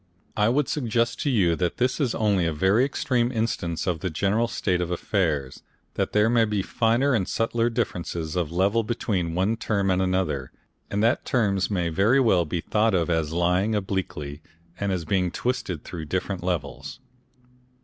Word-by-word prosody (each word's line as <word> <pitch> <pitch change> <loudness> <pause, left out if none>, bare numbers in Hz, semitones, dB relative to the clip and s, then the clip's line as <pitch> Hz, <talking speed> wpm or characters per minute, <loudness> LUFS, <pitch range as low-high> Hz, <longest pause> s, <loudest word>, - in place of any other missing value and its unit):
I 105 +1 +3
would 135 +2 +1
suggest 115 -4 0
to 145 - 0
you 95 -10 +3
that 90 -2 -1
this 125 +3 0
is 130 -5 0
only 100 -6 +2
a - - 0
very 95 +9 +3
extreme 125 -3 0
instance 110 -8 -2
of 90 -3 -1
the 95 - -2
general 100 +8 +1
state 90 -5 -1
of 85 - -2
affairs, 80 -7 -1 0.3
that - - -1
there 105 +1 +3
may 115 -1 +4
be 105 -3 -1
finer 120 +6 +2
and 95 -6 +1
subtler 115 +1 0
differences 85 -8 -3
of 85 -4 -1
level 100 +6 +2
between 100 -7 -2
one 100 +5 +1
term 100 -4 0
and 90 0 +2
another, 90 -8 -1 0.4
and 105 +1 0
that 120 +4 +2
terms 100 -7 +1
may 90 -5 0
very 100 +11 +3
well 95 -9 +3
be 85 +2 -3
thought 110 +2 +1
of 85 -1 +1
as 80 -2 0
lying 90 +5 +1
obliquely 90 -7 -3 0.4
and 100 -1 -1
as 90 -3 -2
being 90 +1 +1
twisted 115 -6 -3
through 80 -3 -7
different 95 +3 -2
levels. 90 -2 -4
95 Hz, 180 wpm, -25 LUFS, 85-115 Hz, 0.4 s, may